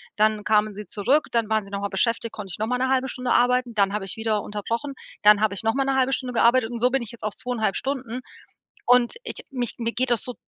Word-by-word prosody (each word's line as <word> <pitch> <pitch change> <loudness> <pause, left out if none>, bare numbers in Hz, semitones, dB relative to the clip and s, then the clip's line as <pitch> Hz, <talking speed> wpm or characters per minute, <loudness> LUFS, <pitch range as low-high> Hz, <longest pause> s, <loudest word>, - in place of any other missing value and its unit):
Dann 215 0 +2
kamen 215 -1 +2
sie 210 +1 -7
zurück, 240 - +1
dann 230 -2 0
waren 220 -2 +1
sie 200 - -14
noch 200 0 -3
mal 200 - -2
beschäftigt, 230 +4 0
konnte 200 -3 -8
ich - - -7
noch 215 - -1
mal 250 +1 0
'ne 260 +1 0
1/2 265 0 +2
Stunde 250 -1 -3
arbeiten. 250 0 +3
Dann 200 -2 +2
habe 205 -1 -3
ich 195 - -5
wieder 220 -2 -1
unterbrochen, 230 +7 -4 0.3
dann 210 0 +7
habe 215 -2 +1
ich 200 - -6
noch 225 0 +2
mal 270 - +1
'ne 270 - +1
1/2 265 0 +2
Stunde 255 -2 -3
gearbeitet 235 0 +4
und 240 - -5
so 250 +2 +2
bin 270 0 +1
ich 235 - -6
jetzt 235 - -13
auf 215 -1 -2
2,5 230 -6 -1
Stunden. 255 -3 -3 0.7
Und 245 -1 +4
ich - - -6
mich 245 -4 -3
mir 230 0 -1
geht 250 +1 -1
das 235 -4 +2
so 250 - -6
230 Hz, 270 wpm, -24 LUFS, 210-250 Hz, 0.7 s, dann